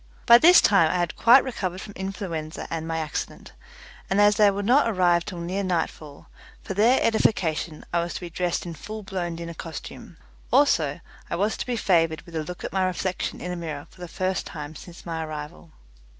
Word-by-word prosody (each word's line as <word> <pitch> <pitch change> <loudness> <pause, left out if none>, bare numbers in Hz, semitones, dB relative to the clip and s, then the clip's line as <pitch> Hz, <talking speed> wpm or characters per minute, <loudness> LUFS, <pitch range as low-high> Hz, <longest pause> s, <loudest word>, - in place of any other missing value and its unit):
By 235 0 +9
this 350 +5 +8
time 180 -6 +4
I 180 - 0
had 175 -3 -1
quite 245 +3 +6
recovered 190 -8 -4
from 205 - -9
influenza 180 -5 -5
and 160 -1 -3
my 165 0 -2
accident, 155 -2 -5 0.6
and 195 - +1
as 205 0 +5
they 210 -2 +6
would 200 0 -2
not 255 +5 +4
arrive 175 -4 +2
till 185 - -6
near 180 +4 -3
nightfall, 160 -5 -3 0.4
for - - -4
their 225 +7 +4
edification 170 -8 0
I 170 - +3
was 170 0 -3
to - - -5
be 175 -1 -7
dressed 175 +1 -2
in 170 - -5
full 215 +7 -8
blown 180 -4 -4
dinner 170 0 -6
costume, 165 -1 -9 0.3
also - - +3 0.3
I - - -2
was 205 +5 0
to - - -5
be 245 - -1
favoured 165 -6 +2
with 170 - -12
a 160 - -1
look 180 +3 -8
at - - -5
my 190 -1 +1
reflection 185 0 -3
in 180 - -4
a - - -3
mirror 155 -4 -6
for 180 - -17
the 175 - -6
first 185 +2 -2
time 150 -2 -7
since 175 +2 -12
my 165 -2 -3
arrival. 155 +1 -8
175 Hz, 205 wpm, -25 LUFS, 165-200 Hz, 0.6 s, By